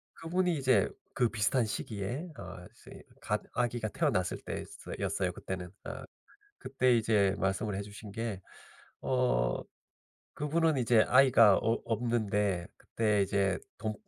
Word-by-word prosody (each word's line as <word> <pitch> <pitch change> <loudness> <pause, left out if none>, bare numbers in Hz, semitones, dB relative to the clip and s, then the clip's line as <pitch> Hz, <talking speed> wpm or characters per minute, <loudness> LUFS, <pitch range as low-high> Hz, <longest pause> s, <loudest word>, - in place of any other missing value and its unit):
그분이 175 +1 0
이제 130 -7 +3 0.2
그 120 -2 +2
비슷한 115 +3 +1
시기에 110 - -4
어 90 - -9
이제 - - -14 0.2
갓 - - -1
아기가 120 -2 -1
태어났을 90 -2 0
때 - - -4
스 - - -11
였어요 - - -1
그때는. 90 -1 -5 0.2
어 - - -6 0.6
그때 130 -2 +2
이제 105 -4 +3
말씀을 95 +1 -1
해 100 - -3
주신 105 +1 -10
게 110 -3 -4 0.6
어 125 - +1 0.7
그분은 155 +1 +1
이제 120 -3 +4
아이가 125 -6 +6
없 115 +1 0
없는데 105 -6 0
그때 105 -2 0
이제 100 0 +1 0.2
돈 110 0 -2
110 Hz, 260 characters per minute, -31 LUFS, 100-125 Hz, 0.7 s, 아이가